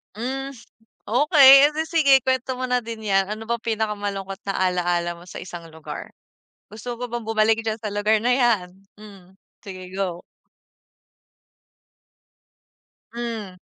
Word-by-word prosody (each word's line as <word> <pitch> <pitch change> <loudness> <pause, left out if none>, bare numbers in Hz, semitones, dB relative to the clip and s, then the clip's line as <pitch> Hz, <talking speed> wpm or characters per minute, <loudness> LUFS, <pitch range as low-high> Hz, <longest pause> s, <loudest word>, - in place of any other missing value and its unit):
Mm. 270 +4 -4 0.5
Okey 275 - +7
edi 310 +1 -3
sige 305 -5 +4
kuwento 260 0 -1
mo 255 - -4
na 250 -1 +1
din 225 -1 -8
'yan. 195 -1 +2
Ano 215 +1 -5
bang 235 0 -2 0.2
pinakamalungkot 205 -2 -3
na 195 - -1
ala-ala 175 -2 0
mo 175 +1 -14
sa - - -10
isang 175 -2 -8
lugar? 160 -1 -9 0.6
Gusto 235 +3 -8
mo 245 - -4
bang 240 0 -5
bumalik 220 0 +1
diyan 220 0 -2
sa 210 -1 -5
lugar 210 +1 +2
na 245 +3 +2
'yan? 220 -8 +1 0.2
Mm, 195 -3 -15 0.2
sige 185 -2 -9
go. 180 -3 -3 2.9
Mm. 225 -5 -6
220 Hz, 135 wpm, -23 LUFS, 195-245 Hz, 2.9 s, Okey